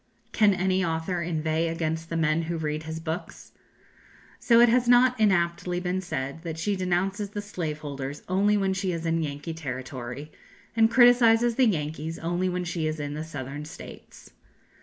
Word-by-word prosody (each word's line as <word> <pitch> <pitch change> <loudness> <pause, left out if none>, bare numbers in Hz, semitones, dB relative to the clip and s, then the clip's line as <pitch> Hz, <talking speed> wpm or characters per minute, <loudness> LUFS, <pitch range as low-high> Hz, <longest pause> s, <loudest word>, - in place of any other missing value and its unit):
Can 210 -3 +4
any 185 0 +1
author 165 +1 -1
inveigh 160 -1 -1
against 165 0 -3
the 165 - -2
men 160 0 +2
who 170 - -1
read 155 -1 -2
his 160 0 -5
books? 165 +3 -6 0.9
So 230 -1 +4
it 240 - +8
has 240 +1 +3
not 245 0 +5
inaptly 175 -3 +1
been 180 +1 -2
said 140 -4 -4
that 165 -2 -5
she 200 +5 -1
denounces 190 +3 -1
the 205 - -5
slave 170 -7 -4
holders 140 -1 -6
only 200 +3 +2
when 195 -1 +1
she 190 -1 -1
is 165 0 -4
in 165 0 +1
Yankee 150 +2 -4
territory, 130 -1 -6 0.4
and 225 -1 +5
criticises 240 -1 +5
the 255 +1 +3
Yankees 160 -3 -2
only 175 +2 -1
when 180 0 -2
she 170 -2 -2
is 155 0 -3
in 145 0 -4
the 155 +1 -4
Southern 145 -2 -6
States. 160 +3 -12
170 Hz, 175 wpm, -26 LUFS, 155-195 Hz, 0.9 s, it